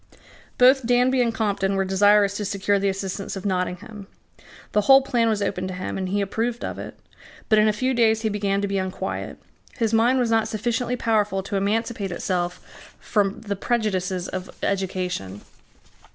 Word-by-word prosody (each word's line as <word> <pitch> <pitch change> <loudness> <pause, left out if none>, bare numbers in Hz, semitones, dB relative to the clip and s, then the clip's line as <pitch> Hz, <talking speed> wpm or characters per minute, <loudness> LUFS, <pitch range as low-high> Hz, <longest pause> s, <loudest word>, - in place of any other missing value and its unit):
Both 255 0 +5
Danby 250 +1 +3
and 235 -1 +2
Compton 200 -3 -1
were 195 0 +1
desirous 200 +1 +4
to 210 - -3
secure 200 0 0
the 200 0 +1
assistance 195 +1 -4
of 195 - -7
Nottingham. 195 +2 -3 0.6
The 210 - +3
whole 270 +5 +6
plan 235 -3 +1
was 210 -2 0
opened 185 -1 -2
to 185 - -5
him; 185 - -4
and 190 -1 -3
he 200 +2 0
approved 230 +4 -2
of - - -5
it. - - -8 0.5
But 215 -1 +5
in 215 - +4
a - - +4
few 255 +5 -1
days 225 -2 +3
he - - +1
began 200 -1 -1
to - - +1
be 195 0 -1
unquiet. 185 0 -4 0.4
His 225 -1 0
mind 235 +4 +4
was 245 -3 +1
not 225 -1 +2
sufficiently 235 +3 -1
powerful 210 -5 0
to 200 +1 -5
emancipate 205 0 -1
itself 175 0 -4
from 205 -2 0
the 205 -2 -3
prejudices 190 -5 -1
of 185 0 -5
education. 180 - -2
205 Hz, 180 wpm, -23 LUFS, 195-225 Hz, 0.6 s, whole